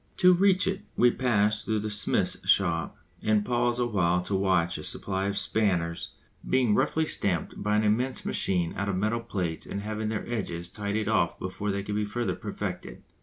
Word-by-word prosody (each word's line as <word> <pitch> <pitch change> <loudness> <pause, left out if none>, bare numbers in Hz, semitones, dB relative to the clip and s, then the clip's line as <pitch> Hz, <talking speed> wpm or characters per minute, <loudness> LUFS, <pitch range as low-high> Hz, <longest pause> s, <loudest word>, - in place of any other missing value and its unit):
To 180 0 +6
reach 185 0 +4
it 190 +1 -1 0.2
we 125 - +5
pass 105 -5 +1
through 110 - 0
the 110 0 -3
smith's 105 - 0
shop 85 -4 +2 0.2
and 105 -1 +2
pause 120 0 +1
awhile 95 -8 +1
to 100 - -4
watch 95 -4 +1
a - - -7
supply 95 +3 -2
of 100 0 -1
spanners 90 -6 0 0.3
being 125 -5 +3
roughly 160 +8 +2
stamped 95 - -2
by 105 +1 +1
an 105 - +3
immense 120 +5 0
machine 90 -3 0
out 100 0 -2
of 100 - 0
metal 110 +4 0
plates 90 -8 -3
and 100 - -4
having 110 0 -3
their 110 -1 -3
edges 90 -7 -3
tidied 105 +1 -2
off 110 -6 +1
before 95 +3 -4
they 100 0 -1
can 105 - -4
be 105 0 0
further 120 +3 -2
perfected. - - -6
105 Hz, 185 wpm, -27 LUFS, 95-115 Hz, 0.3 s, To